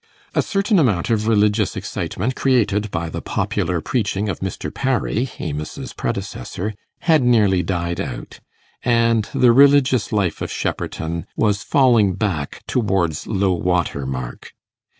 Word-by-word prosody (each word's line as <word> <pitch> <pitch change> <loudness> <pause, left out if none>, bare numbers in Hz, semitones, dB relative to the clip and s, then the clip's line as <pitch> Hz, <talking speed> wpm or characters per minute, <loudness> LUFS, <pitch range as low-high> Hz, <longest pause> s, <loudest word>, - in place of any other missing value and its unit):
A - - +3
certain 200 0 +1
amount 110 - +1
of 110 -1 +1
religious 105 -2 +2
excitement 125 +3 -3
created 105 -5 +1
by 85 -2 -3
the 80 - -5
popular 90 -3 -1
preaching 105 0 -1
of 95 - -3
Mr. 95 0 -4
Parry, 130 -1 0
Amos's 75 -1 -5
predecessor, 95 +11 -4 0.3
had 160 -3 +4
nearly 105 -7 +3
died 85 -1 -2
out, - - -7 0.4
and 115 -2 +2
the 125 -2 +4
religious 130 -3 +5
life 100 -6 0
of - - -3
Shepperton 85 +2 -3
was 105 -2 +1
falling 120 - +3
back 90 -8 -3
towards 95 -9 0
low 100 -3 +1
water 85 -6 -1
mark. 65 -2 -6
105 Hz, 130 wpm, -20 LUFS, 90-120 Hz, 0.4 s, religious